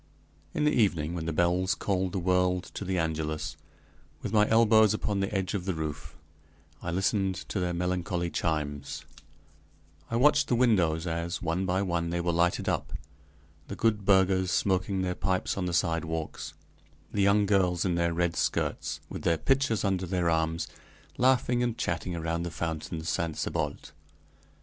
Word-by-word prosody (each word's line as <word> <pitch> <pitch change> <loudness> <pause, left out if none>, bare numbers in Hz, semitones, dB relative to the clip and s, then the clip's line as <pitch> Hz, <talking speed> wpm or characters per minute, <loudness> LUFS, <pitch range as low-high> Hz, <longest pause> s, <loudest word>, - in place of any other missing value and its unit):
In - - +1
the 150 - +4
evening, 85 -8 +1
when 80 -2 -4
the - - 0
bells 90 +3 +2
called 95 -2 -1
the 100 - -3
world 90 0 +2
to - - -5
the 95 -1 -1
Angelus, 80 -2 -2 0.7
with - - -4
my 105 -1 +4
elbows 110 -2 +5
upon 105 -2 -1
the 95 0 -1
edge 95 -2 -1
of 95 -3 -2
the 95 -3 -1
roof, 80 -2 -5 0.7
I 85 - -4
listened 95 +2 +1
to 100 - -2
their 90 -1 0
melancholy 90 -1 -1
chimes; 75 -3 -2 1.0
I 115 - -2
watched 145 +3 +4
the 125 - +2
windows 90 -10 +2
as, 85 +1 -3
one 85 +3 -1
by 95 +2 +1
one, 85 -3 -1
they 85 +1 -1
were 85 0 0
lighted 85 +1 +1
up; - - -1 0.7
the 100 - -5
good 110 -3 +1
burghers 95 -1 +3
smoking 95 0 +1
their 90 0 0
pipes 95 0 -1
on 95 - -2
the 90 - -1
sidewalks; 80 -1 -2 0.6
the 100 - +1
young 100 +1 +4
girls 95 -3 +2
in 90 - +1
their 85 0 +1
red 85 0 0
skirts, - - -1
with - - -7
their 85 -1 +2
pitchers 135 - +1
under 95 -2 0
their 90 -2 +1
arms, 80 0 0 0.5
laughing 125 -1 +3
and 120 -1 -1
chatting 85 -2 -2
around 85 0 -2
the 85 - -3
fountain 80 -1 -4
"Saint 80 -1 -1
Sebalt." - - -3
90 Hz, 170 wpm, -28 LUFS, 85-100 Hz, 1.0 s, elbows